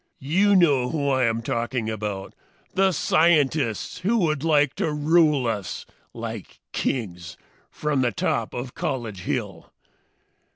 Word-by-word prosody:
"You 190 +9 +3
know 145 -9 +4
who 145 -2 -1
I 130 -2 +2
am 115 0 0
talking 115 0 -2
about! 105 -3 -4 0.4
The 190 +1 +3
scientists 155 - +2
who 205 +6 +1
would 155 -8 0
like 150 -4 +3
to 155 - 0
rule 150 -2 +3
us, 105 -5 -3 0.3
like - - -7
kings, 90 -9 -3 0.3
from 150 -3 -1
the 120 -2 +2
top 100 - -1
of 125 +1 -5
College 120 -9 -3
Hill! 95 -4 -4
135 Hz, 130 wpm, -24 LUFS, 115-155 Hz, 0.4 s, know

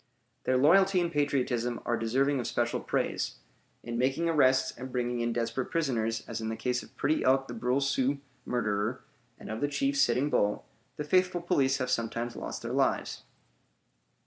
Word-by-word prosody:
Their 130 - +3
loyalty 190 +7 +5
and 170 -1 0
patriotism 125 -5 0
are 120 - +1
deserving 130 +5 +1
of 120 - -3
special 120 0 0
praise. - - -1 0.5
In 120 0 -4
making 135 +6 +1
arrests 130 -5 +3
and 130 +2 -8
bringing 120 -1 -1
in 120 0 0
desperate 115 +2 -2
prisoners, 115 -8 -1
as 115 -1 -4
in 110 - -2
the 110 - -2
case 125 +1 -1
of - - -16
Pretty 150 +3 +1
Elk 135 +1 +3
the 120 - -6
Brule 125 +4 0
Sioux 135 0 +1 0.3
murderer, 110 0 -1 0.3
and - - -8
of 110 - -4
the 145 - +2
chief, 140 -1 0
Sitting 135 +1 +2
Bull, 105 0 +1 0.3
the 150 - -2
faithful 180 +3 +2
police 135 -6 +2
have 130 0 -2
sometimes 115 0 -2
lost - - -6
their - - -4
lives. - - 0
130 Hz, 175 wpm, -29 LUFS, 120-140 Hz, 0.5 s, loyalty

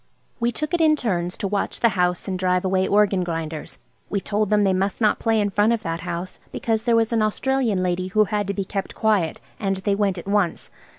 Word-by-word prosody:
We 235 0 +1
took 305 +5 -4
it 345 - +2
in 310 -1 +5
turns 180 -9 -2
to 200 - -2
watch 200 +1 -2
the 235 - +4
house 180 -2 0
and 185 -1 -2
drive 180 0 +1
away 190 0 +1
organ 200 -2 +3
grinders. 165 -2 -5 0.3
We 200 - 0
told 205 +1 -1
them 210 -1 +3
they 195 -1 +3
must 195 +2 -1
not 215 -2 +2
play 225 -1 +2
in 205 -1 0
front 210 +3 +3
of 225 -1 -2
that 165 -2 -3
house, 175 +2 -5
because 225 0 -1
there 235 -2 +3
was 230 0 +2
an 225 - +2
Australian 220 -2 +1
lady 180 0 -1
who 215 +3 +3
had 205 -1 -1
to 200 - -1
be 195 - -2
kept 195 0 -4
quiet. 210 -7 +1 0.2
And 195 -3 -1
they 200 +1 0
went 200 -2 0
at 175 - -8
once. 200 -4 0
200 Hz, 235 wpm, -23 LUFS, 185-220 Hz, 0.3 s, in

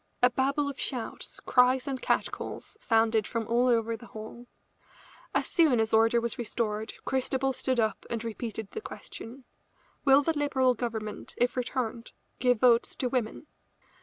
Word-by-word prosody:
A 250 - +7
babel 275 +3 +1
of 280 -1 -5
shouts, 245 -4 -3
cries 250 0 +3
and 265 -2 -3
catcalls - - -2
sounded 225 - +2
from 230 -2 -3
all 240 +2 +3
over 230 -2 +2
the 235 +2 -12
hall. 220 +3 -9 0.9
As - - +2
soon 310 -9 +3
as 220 0 0
order 225 +1 +5
was 235 0 -3
restored 220 -2 -2
Christabel 265 0 0
stood 255 -1 -1
up 220 -1 0
and 230 -1 -3
repeated 220 -2 -5
the 440 - -5
question: 255 - -9 0.6
"Will 275 0 +6
the 325 +2 0
Liberal 265 -3 +2
Government, 220 -3 -5
if 245 0 +2
returned, 245 -2 -3 0.3
give 245 -2 +3
votes 235 -2 +4
to 250 - -1
women?" 245 +1 -2
240 Hz, 155 wpm, -29 LUFS, 225-260 Hz, 0.9 s, A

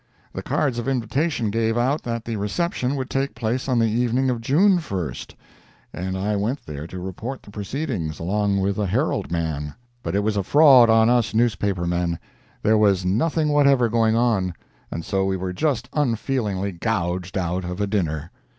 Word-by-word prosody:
The - - -4
cards 130 -5 0
of 120 - -4
invitation 125 -1 0
gave 115 +1 0
out 130 +5 +1
that 115 -1 -4
the 115 - -3
reception 125 - -1
would 130 -2 -3
take 135 +1 -2
place 120 +3 -2
on 125 - +2
the 115 - +3
evening 120 +3 +1
of 120 -2 -3
June 180 - +4
1st, 95 - -5 0.6
and 95 +3 -3
I 105 +2 -1
went 110 +8 -2
there 75 +1 -6
to 90 - -8
report 95 +9 -6
the 105 - -13
proceedings, 105 - -3
along 100 +3 0
with 100 +1 0
a 105 - 0
Herald 90 - -1
man. 80 -3 -2 0.3
But - - -3
it 100 - +1
was 105 -1 0
a - - +2
fraud 135 - +6
on 110 0 +5
us 120 -3 +1
newspaper 100 -5 +1
men—there 85 +5 -2
was 100 -3 +3
nothing 150 - +1
whatever 140 -5 +4
going 115 -1 +2
on, 105 -7 +1 0.3
and 85 - -5
so 95 -1 0
we 95 0 0
were 90 0 -4
just 125 +2 -1
unfeelingly 115 -7 -1
gouged 90 -1 -2
out 90 0 -1
of 90 +2 -5
a 105 - +1
dinner. 85 -6 -2
110 Hz, 180 wpm, -23 LUFS, 95-125 Hz, 0.6 s, fraud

